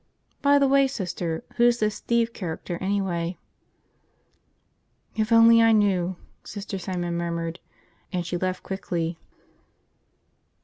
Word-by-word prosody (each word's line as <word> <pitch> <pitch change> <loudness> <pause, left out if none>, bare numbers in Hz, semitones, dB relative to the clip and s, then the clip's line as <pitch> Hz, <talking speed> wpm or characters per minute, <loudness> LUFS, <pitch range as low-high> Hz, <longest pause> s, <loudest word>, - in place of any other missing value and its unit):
By 285 0 +5
the 280 -1 +4
way, 275 0 +4
Sister, 175 -9 -4
who's 240 0 +4
this 215 -2 0
Steve 235 0 0
character 175 -1 -5
anyway?" 185 -3 -1 1.8
"If 220 +1 -1
only 230 0 +7
I 225 0 +5
knew!" 190 -4 +2 0.3
Sister 200 -1 -6
Simon 175 -2 -3
murmured, 170 0 -3 0.5
and 180 -3 -2
she 170 - -3
left 185 +1 -2
quickly. 170 -3 -3
190 Hz, 115 wpm, -25 LUFS, 175-230 Hz, 1.8 s, only